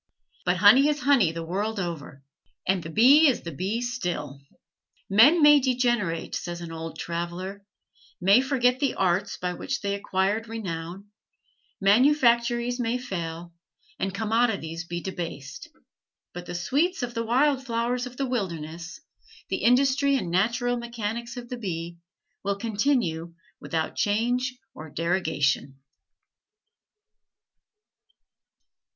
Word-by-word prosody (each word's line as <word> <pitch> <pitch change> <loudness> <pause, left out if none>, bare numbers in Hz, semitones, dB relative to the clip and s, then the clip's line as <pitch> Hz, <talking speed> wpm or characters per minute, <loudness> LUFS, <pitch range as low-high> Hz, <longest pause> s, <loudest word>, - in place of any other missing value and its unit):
But 180 0 +2
honey 215 +10 +7
is 295 -1 -1
honey 250 - +4
the 165 0 -6
world 205 +5 -2
over; 150 -6 -6 0.4
and 190 -1 +2
the 160 - -8
bee 265 - +6
is 265 - +1
the 170 - -5
bee 195 - -2
still. 175 - -4 0.7
"Men 285 - +6
may 295 0 +8
degenerate," 240 -10 0
says 175 0 -4
an 170 -1 -7
old 165 0 -7
traveler, 175 +4 -5 0.6
"may 195 +7 +5
forget 260 -2 +1
the 275 -3 0
arts 190 +1 0
by 180 0 -3
which 275 +9 -4
they 200 -1 -1
acquired 200 +2 -1
renown; 195 -2 -6 0.7
manufactories 240 +2 +3
may 240 0 0
fail, 170 -7 -6 0.5
and 195 - -1
commodities 200 -6 -1
be 175 0 -5
debased, 165 -8 -6 0.7
but 175 0 -8
the - - -5
sweets 295 - 0
of 240 -1 -4
the 230 -1 -2
wild 265 +4 +2
flowers 245 0 -1
of 250 0 -12
the 275 - -1
wilderness, 170 -8 -4 0.5
the - - -1
industry 275 +3 +3
and 180 -10 -2
natural 240 +6 +1
mechanics 235 0 -5
of 240 -1 -7
the 250 - -6
bee, 170 -5 -5 0.4
will 200 0 0
continue 200 - -1 0.2
without 160 -1 -3
change 245 +5 0 0.2
or 155 0 -10
derogation." 150 -5 -1
205 Hz, 125 wpm, -26 LUFS, 175-245 Hz, 0.7 s, may